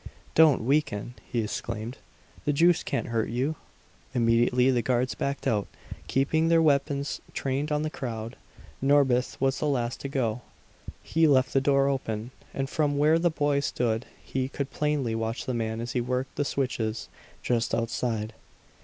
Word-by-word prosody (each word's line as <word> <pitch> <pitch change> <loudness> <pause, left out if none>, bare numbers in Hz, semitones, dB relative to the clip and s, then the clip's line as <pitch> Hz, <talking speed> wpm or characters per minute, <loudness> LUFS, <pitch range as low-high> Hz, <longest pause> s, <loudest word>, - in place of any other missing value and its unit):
"Don't 155 -7 +5
weaken!" 125 -4 0 0.2
he 120 -2 +1
exclaimed. 110 +4 -4 0.5
"The 145 - +2
juice 170 +3 +4
can't 135 - -2
hurt 115 -1 0
you!" 130 +7 -1 0.6
Immediately 120 +2 +3
the 125 -2 +2
guards 125 +1 +1
backed 140 0 -3
out, 105 -3 +1 0.4
keeping 160 +4 +2
their 165 0 +5
weapons 140 -2 +1
trained 140 +3 -1
on 150 0 +1
the 155 - -1
crowd. 115 -3 -5 0.5
Norbith 135 -2 +3
was 135 0 +1
the 150 - 0
last 120 -4 -1
to 140 - -5
go. 125 -4 -1 0.6
He 165 0 +3
left 130 -3 +3
the 135 - +3
door 140 0 +3
open; 120 -4 -2 0.2
and 135 0 -2
from 145 0 0
where 155 +3 +4
the 175 +1 +3
boy 145 -3 +1
stood 120 -4 -1 0.2
he 130 0 -2
could 140 0 -4
plainly 150 -6 0
watch 115 +1 -2
the 130 - -2
man 110 -1 -2
as 120 +1 -4
he 125 - 0
worked 125 +2 -2
the 145 - 0
switches, 120 -5 -2 0.4
just 120 -1 +1
outside. 115 -1 -2
130 Hz, 160 wpm, -27 LUFS, 115-145 Hz, 0.6 s, Don't